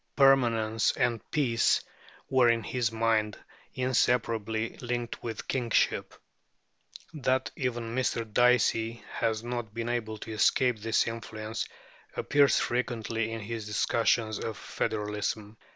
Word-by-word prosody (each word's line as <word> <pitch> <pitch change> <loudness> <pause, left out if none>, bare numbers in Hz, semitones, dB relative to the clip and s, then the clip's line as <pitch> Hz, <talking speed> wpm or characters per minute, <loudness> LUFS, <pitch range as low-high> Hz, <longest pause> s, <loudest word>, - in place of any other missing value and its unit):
Permanence 115 -5 +4
and 120 -3 0
peace 120 -6 +2 0.5
were 130 -2 +4
in 115 -1 +2
his 120 -3 -1
mind 110 -2 +1 0.4
inseparably 115 -3 +1
linked 120 -1 -4
with 115 -2 -5
kingship. 120 -4 0 1.0
That 130 -3 0
even 120 -3 -3
Mr. 120 -2 0
Dicey 115 0 +2
has 110 -1 -1
not 120 -3 -4
been 115 0 -2
able 110 -3 -2
to 110 - -8
escape 120 +2 +2
this 115 +1 +2
influence 110 -1 -5 0.5
appears 140 -2 +4
frequently 115 -2 -1
in 115 0 -4
his 110 0 -5
discussions 110 0 +1
of 110 -3 -4
federalism. 105 0 -3
115 Hz, 115 wpm, -29 LUFS, 110-120 Hz, 1.0 s, Permanence